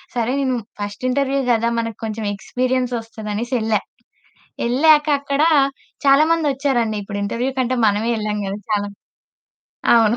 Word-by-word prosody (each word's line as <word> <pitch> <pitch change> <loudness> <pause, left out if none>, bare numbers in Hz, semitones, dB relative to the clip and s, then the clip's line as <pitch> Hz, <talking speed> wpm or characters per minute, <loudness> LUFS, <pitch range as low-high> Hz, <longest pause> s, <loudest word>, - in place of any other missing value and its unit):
సరే, 240 0 0
నేను 260 -2 0 0.2
first 205 +3 -5
interview 275 +1 +1
కదా, 230 0 +2
మనకు 230 -2 -4
కొంచెం 220 0 -4
ఎక్స్పీరియన్స్ 250 +4 -1
ఒస్తదనేసెళ్ళా. 225 0 -2 0.9
ఎళ్ళాక 295 +4 +5
అక్కడ 280 0 -1 0.6
చాలా 275 +2 +6
మందొచ్చారండి, 270 -8 +1
ఇప్పుడు 200 0 -5
ఇంటర్వ్యూ 235 +6 -1
కంటే 255 0 0
మనమే 210 +3 +1
ఎళ్ళం 210 0 -2
కద 195 - -3 0.2
చాలా 205 -1 +1 1.1
అవును 225 0 +4
235 Hz, 125 wpm, -20 LUFS, 215-265 Hz, 1.1 s, చాలా